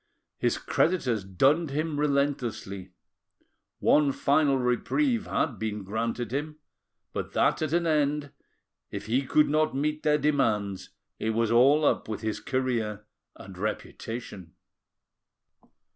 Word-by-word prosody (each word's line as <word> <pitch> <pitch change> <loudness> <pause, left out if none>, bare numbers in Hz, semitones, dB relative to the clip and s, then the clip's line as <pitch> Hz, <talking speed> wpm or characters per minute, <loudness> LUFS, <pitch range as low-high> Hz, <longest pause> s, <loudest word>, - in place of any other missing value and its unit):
His - - +1
creditors 130 - 0
dunned 135 - +2
him 150 +1 -2
relentlessly: 135 -10 -1 0.9
one 150 -2 +4
final 140 0 +2
reprieve 210 - 0
had 125 -10 -1
been 105 -2 -3
granted 115 +3 -3
him, 150 +2 -3 0.6
but - - -4
that - - +2
at 155 -2 -1
an 170 +1 +1
end, 150 -2 +1 0.6
if - - -6
he 125 +5 +1
could 150 +2 +4
not 155 -1 +1
meet 150 +2 -1
their 150 -1 +3
demands, 110 -10 0 0.3
it 110 0 -1
was 115 -1 +1
all 140 +6 +5
up - - +1
with 105 -1 -4
his 110 -1 -2
career 115 -6 -2 0.3
and 95 -1 -11
reputation. 105 -3 -5
135 Hz, 125 wpm, -27 LUFS, 110-150 Hz, 0.9 s, all